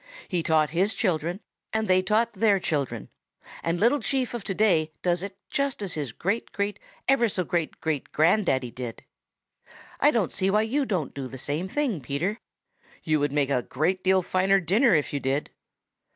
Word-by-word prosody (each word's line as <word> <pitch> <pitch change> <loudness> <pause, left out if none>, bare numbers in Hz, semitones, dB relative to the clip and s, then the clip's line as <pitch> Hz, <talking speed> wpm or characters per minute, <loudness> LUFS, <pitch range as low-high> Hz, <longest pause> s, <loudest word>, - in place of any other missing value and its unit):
He 180 -3 -1
taught 155 -2 +2
his 190 +6 +1
children 175 -1 -1 0.3
and 220 0 0
they 185 0 +4
taught 215 +5 +1
their 205 -1 +3
children, 140 - -2 0.5
and 165 +1 -1
Little 240 +7 +4
Chief 265 -3 -1
of 240 -4 -4
today 180 -6 +2
does 175 -1 +1
it 195 0 -6
just 280 -2 0
as 190 - -3
his 145 -6 -3
great 200 - -2
great 205 0 -2 0.3
ever 250 -4 +4
so 185 -2 -1
great 170 -2 -2
grand 160 +5 +1
daddy 130 -2 0
did. 120 -2 -7 1.0
I 295 - +5
don't 230 - 0
see 190 - +1
why 210 +2 +3
you 265 +5 0
don't 180 -9 -2
do 135 -2 -5
the 130 - -8
same 150 +7 -2
thing, 240 - -1
Peter. 165 - -2 0.6
You 155 -1 +2
would 145 0 0
make 145 -1 +1
me 140 - +2
a - - 0
great 170 +10 -1
deal 190 0 +3
finer 190 +2 +3
dinner 195 +5 +3
if 150 -2 0
you 145 - 0
did." 135 +2 -1
185 Hz, 185 wpm, -26 LUFS, 155-215 Hz, 1.0 s, I